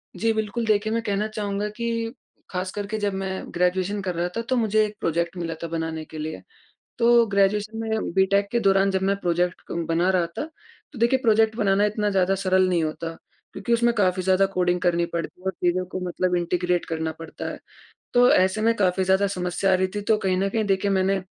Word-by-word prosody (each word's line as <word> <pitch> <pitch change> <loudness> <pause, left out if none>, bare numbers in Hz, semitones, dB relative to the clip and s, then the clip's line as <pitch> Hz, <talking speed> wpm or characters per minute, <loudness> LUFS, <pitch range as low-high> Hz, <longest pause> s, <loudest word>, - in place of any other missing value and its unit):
जी 225 0 +1
बिल्कुल 220 +1 -2
देखिए 215 0 +1
मैं 230 - 0
कहना 205 -1 -1
चाहूँगा 210 -1 -3
कि 230 +1 -3 0.4
ख़ासकर 185 +2 -3
के 220 +1 -3
जब 205 -2 -1
मैं 190 0 -3 0.2
ग्रेजुएशन 185 +3 0
कर 185 -2 -3
रहा 170 +1 0
था, - - 0
तो 245 +3 -1
मुझे 215 -2 +3
एक 210 0 -7
प्रोजेक्ट 170 +2 -1
मिला 165 -1 -3
था - - -2
बनाने 160 -1 -3
के 155 - -10
लिए। 155 +1 -5 0.6
तो 235 0 +5
ग्रेजुएशन 205 +2 +1
में, 220 -3 -2
बीटेक 200 +1 +3
के 235 - +2
दौरान 195 -1 +3
जब 190 -1 -1
मैं 195 +1 +1
प्रोजेक्ट 175 0 0
कं 170 0 -3
बना 170 +3 +2
रहा 180 -2 +2
था, 170 - -5 0.5
तो 265 - -10
देखिए 235 +3 +3
प्रोजेक्ट 220 0 +3
बनाना 200 -2 +2
इतना 210 0 0
ज़्यादा 190 -1 +2
सरल 185 -1 +2
नहीं 175 -2 +1
होता। 165 +1 -4 0.4
क्योंकि 235 - -3
उसमें 235 0 +3
काफ़ी 185 -3 +1
ज़्यादा 190 +1 +3
कोडिंग 180 -1 +1
करनी 170 -1 +2
पड़ती 170 +1 -5
है - - -19
और 190 - +1
चीज़ों 180 +1 +2
को 185 +1 -5
मतलब 180 +1 0
इंटीग्रेट 175 0 0
करना 160 -1 -3
पड़ता 165 - -7
है। - - -7 0.6
तो, 245 0 +6
ऐसे 190 +3 +3
में 230 +1 +3
काफ़ी 190 -2 +1
ज़्यादा 190 +2 +3
समस्या 185 0 -1
आ - - +5
रही 185 0 +1
थी, 205 - -2
तो 215 +1 +2
कहीं 190 -3 0
न 195 +1 +1
कहीं 220 +2 0
देखिए, 195 0 +1
मैंने 190 0 +1
195 Hz, 215 wpm, -24 LUFS, 180-215 Hz, 0.6 s, तो